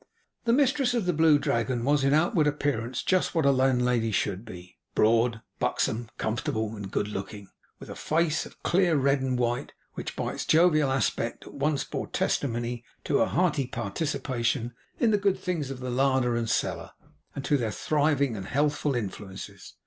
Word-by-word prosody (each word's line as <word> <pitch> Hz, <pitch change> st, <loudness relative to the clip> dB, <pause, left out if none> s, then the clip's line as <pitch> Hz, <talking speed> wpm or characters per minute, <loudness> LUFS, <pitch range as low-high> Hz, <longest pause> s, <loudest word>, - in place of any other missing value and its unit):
The 230 Hz, -, +3 dB
mistress 270 Hz, -1 st, +2 dB
of 230 Hz, -5 st, 0 dB
the 180 Hz, -, +1 dB
Blue 160 Hz, -1 st, +5 dB
Dragon 120 Hz, -2 st, -1 dB
was 145 Hz, 0 st, +3 dB
in 135 Hz, -, +3 dB
outward 155 Hz, +1 st, +3 dB
appearance 130 Hz, -5 st, -1 dB
just 185 Hz, -1 st, +1 dB
what 160 Hz, -3 st, +2 dB
a 140 Hz, -, +6 dB
landlady 125 Hz, -3 st, +2 dB
should 100 Hz, -1 st, -1 dB
be: 90 Hz, -4 st, -11 dB, 0.2 s
broad, 115 Hz, +1 st, +3 dB, 0.2 s
buxom, 115 Hz, +1 st, -1 dB
comfortable, 110 Hz, 0 st, -2 dB
and 100 Hz, -2 st, -7 dB
good 100 Hz, -, -1 dB
looking, 100 Hz, 0 st, -6 dB, 0.3 s
with -, -, -10 dB
a -, -, -7 dB
face 160 Hz, 0 st, 0 dB
of -, -, -20 dB
clear 175 Hz, -2 st, +3 dB
red 140 Hz, 0 st, +2 dB
and 130 Hz, -1 st, 0 dB
white, 120 Hz, 0 st, -1 dB, 0.2 s
which, -, -, -6 dB
by -, -, -2 dB
its -, -, -4 dB
jovial 155 Hz, -4 st, +4 dB
aspect, 125 Hz, -3 st, -1 dB
at -, -, -11 dB
once 145 Hz, 0 st, 0 dB
bore -, -, -5 dB
testimony 120 Hz, -2 st, -1 dB, 0.2 s
to -, -, +1 dB
her -, -, +3 dB
hearty 150 Hz, -6 st, +1 dB
participation 120 Hz, +1 st, -2 dB, 0.3 s
in 230 Hz, -, +3 dB
the 210 Hz, -, +3 dB
good 200 Hz, -1 st, +2 dB
things 165 Hz, -7 st, -3 dB
of 135 Hz, -1 st, -6 dB
the 125 Hz, 0 st, -3 dB
larder 130 Hz, -1 st, +2 dB
and 115 Hz, -1 st, -1 dB
cellar, -, -, -1 dB, 0.4 s
and 140 Hz, -, -5 dB
to 145 Hz, -, +2 dB
their 120 Hz, -5 st, 0 dB
thriving 145 Hz, 0 st, +1 dB
and 95 Hz, -2 st, -6 dB
healthful 145 Hz, 0 st, 0 dB
influences. 100 Hz, -3 st, -6 dB
130 Hz, 180 wpm, -27 LUFS, 115-155 Hz, 0.4 s, a